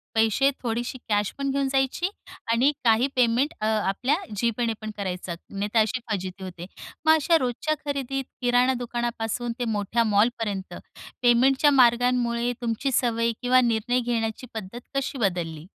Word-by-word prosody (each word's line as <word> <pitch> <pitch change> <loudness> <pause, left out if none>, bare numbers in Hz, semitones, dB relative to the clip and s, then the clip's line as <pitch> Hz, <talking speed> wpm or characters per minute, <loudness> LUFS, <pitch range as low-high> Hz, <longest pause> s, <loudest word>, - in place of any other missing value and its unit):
पैसे 225 +5 +3
थोडीशी 240 +2 -2
कॅश 205 -1 +1
पण 275 0 -2
घेऊन 275 0 0
जायची 270 +7 0 0.4
आणि 250 +5 +4
काही 230 +2 +4
पेमेंट 250 +5 +2
अ, - - 0
आपल्या 220 +6 +1 0.2
जीपेने 230 +1 0
पण 215 - -5
करायचं. 185 -3 -4
नाही 200 +1 -3
तर 225 - +4
अशी 220 +4 +1
फजिती 190 -1 -4
होते. 175 -1 -7 0.4
मग 315 - +7
अशा 325 +2 +3
रोजच्या 260 +4 -1
खरेदीत 270 -1 -2 0.2
किराणा 245 +1 +3
दुकानापासून 240 -1 -3
ते 245 - -1
मोठ्या 220 +1 0
मॉलपर्यंत, 205 -2 0 0.5
पेमेंटच्या 265 +4 +4
मार्गांमुळे 245 -1 +3
तुमची 235 +4 -1
सवय 230 -2 +1
किंवा 255 0 +4
निर्णय 240 +1 +1
घेण्याची 230 0 -2
पद्धत 220 +1 -6 0.2
कशी 275 0 -2
बदलली? 170 -7 -2
235 Hz, 145 wpm, -25 LUFS, 215-255 Hz, 0.5 s, मग